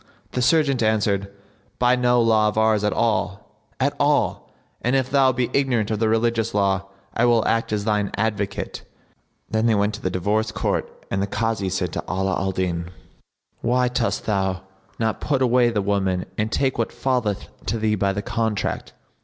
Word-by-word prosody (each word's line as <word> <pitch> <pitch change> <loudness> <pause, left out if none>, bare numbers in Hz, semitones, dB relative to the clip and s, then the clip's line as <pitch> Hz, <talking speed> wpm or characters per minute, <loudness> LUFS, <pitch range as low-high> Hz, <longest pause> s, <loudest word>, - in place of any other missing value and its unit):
The 125 - -1
serjeant 140 -2 +3
answered, 100 -3 +1 0.5
"By 125 0 +4
no 125 -1 +3
law 110 -2 +4
of 105 - -2
ours 110 -1 +3
at 105 - +2
all, 105 -2 -1 0.2
at 140 +2 +1
all; 145 0 +1 0.3
and 125 +3 +1
if 130 -1 0
thou 135 -2 +5
be 125 -1 -1
ignorant 120 -6 +1
of 110 - -1
the 110 -1 +2
religious 115 0 +1
law, 100 -1 +1 0.3
I 120 - +2
will 120 -2 +3
act 115 -1 0
as 105 -1 -1
thine 105 -2 +1
advocate." 105 -2 -2 0.7
Then 110 +1 +2
they 115 - +3
went 105 +1 +1
to 105 - -7
the 95 - -1
divorce 105 +5 0
court - - -1 0.2
and 95 - 0
the 100 - 0
Kazi 105 -2 -1
said 90 -3 -2
to - - -3
Ala 95 +1 0
al 95 0 0
Din, 90 -2 -2 0.7
"Why 125 +1 +2
dost 120 -1 -1
thou 95 -3 0 0.3
not 110 -1 -1
put 135 -3 +1
away 125 -1 +4
the 105 -4 -1
woman 95 -2 0
and 110 +2 -1
take 130 -3 0
what 115 - 0
falleth 125 -7 -1 0.2
to 115 - 0
thee 110 -1 +1
by 100 -1 +1
the 100 +1 -3
contract?" 110 -3 -2
110 Hz, 185 wpm, -23 LUFS, 100-120 Hz, 0.7 s, thou